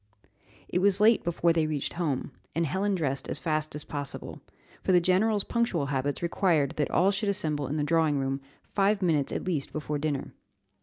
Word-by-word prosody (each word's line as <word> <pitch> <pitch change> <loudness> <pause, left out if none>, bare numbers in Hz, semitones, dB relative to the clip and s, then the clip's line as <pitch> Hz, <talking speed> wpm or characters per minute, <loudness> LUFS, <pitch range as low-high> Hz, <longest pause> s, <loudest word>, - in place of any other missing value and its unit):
It 180 - 0
was 195 0 +3
late 220 +1 +5
before 170 0 +2
they 160 -2 +1
reached 150 -3 -3
home, 150 -6 -2 0.2
and 165 +1 +1
Helen 190 +6 0
dressed 140 -6 -2
as - - -1
fast 155 -2 -2
as 150 - -6
possible, 145 -2 -6 0.4
for 185 - +2
the 180 - +7
general's 195 +4 +2
punctual 235 -11 0
habits 140 +2 -2
required 165 -5 +2
that 150 - 0
all 190 +2 +3
should 205 +1 -1
assemble 150 -7 0
in 145 +4 -2
the 150 - 0
drawing 160 -1 +2
room 135 0 -1 0.2
five 200 0 +1
minutes 155 -6 +2
at - - -3
least 160 -7 -2
before 150 -1 -3
dinner. 145 -2 -2
160 Hz, 190 wpm, -28 LUFS, 145-190 Hz, 0.4 s, the